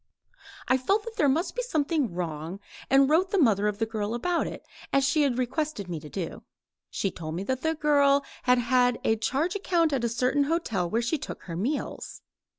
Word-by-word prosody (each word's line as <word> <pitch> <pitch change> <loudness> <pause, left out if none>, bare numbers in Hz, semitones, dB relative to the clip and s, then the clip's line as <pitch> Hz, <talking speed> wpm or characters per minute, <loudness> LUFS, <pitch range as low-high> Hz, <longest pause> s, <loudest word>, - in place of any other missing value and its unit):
I 260 - +3
felt 400 +11 +1
that 455 0 -9
there 290 - +4
must 320 +7 0
be - - 0
something 310 - 0
wrong 170 +1 -4 0.3
and 270 +1 +5
wrote 335 +6 +3
the 400 - 0
mother 210 - +3
of 210 -1 -1
the 225 - 0
girl 220 0 -3
about 340 +8 0
it, - - -8 0.3
as 275 0 +3
she 305 +2 +2
had 270 -4 +1
requested 255 - -2
me 170 -3 -4
to 150 - -11
do. 180 -1 -5 0.5
She 195 - -2
told 160 -1 -6
me 185 - -3
that 260 +4 -2
the 320 0 0
girl 285 -2 +3 0.2
had 250 0 +3
a 220 - +3
charge 275 - -1
account 340 -5 +1
at 260 -3 0
a 235 - +1
certain 255 +5 +1
hotel 225 - -1
where 230 +4 0
she 295 +6 0
took - - -7
her 170 - -6
meals. 245 - -3
260 Hz, 205 wpm, -27 LUFS, 215-310 Hz, 0.5 s, and